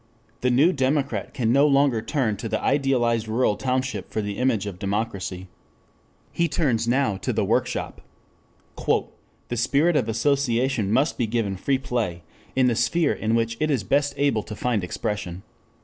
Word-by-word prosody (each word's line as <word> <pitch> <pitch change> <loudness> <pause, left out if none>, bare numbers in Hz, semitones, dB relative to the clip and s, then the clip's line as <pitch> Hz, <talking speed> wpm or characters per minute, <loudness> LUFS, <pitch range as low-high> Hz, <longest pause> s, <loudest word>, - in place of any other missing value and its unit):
The 125 - +1
new 145 +9 +4
democrat 140 +1 0
can 115 -3 0
no 140 +2 +5
longer 140 -5 +3
turn 115 -2 0
to 115 +2 -5
the 110 - 0
idealized 120 -5 +1
rural 110 -1 +1
township 130 -6 -2
for - - -3
the 105 -1 -3
image 125 -5 +1
of 95 -3 -6
democracy. 100 -2 -3 0.8
He 170 - +1
turns 120 -8 0
now 125 -5 +1
to - - -2
the - - 0
workshop. - - -1 0.7
"The 120 - -3
spirit 145 +8 +2
of 125 -6 +1
association 125 -2 +1
must 145 +8 +1
be 120 - +1
given 110 -3 -1
free 135 +8 0
play 120 -10 -3 0.3
in 130 -1 +4
the 125 - +3
sphere 145 +8 +2
in 110 +1 -1
which 115 0 0
it 155 - +1
is 135 -8 +1
best 140 +6 +1
able 140 -6 +2
to 105 - -8
find 115 -3 -1
expression. 90 0 -4
120 Hz, 165 wpm, -24 LUFS, 110-135 Hz, 0.8 s, no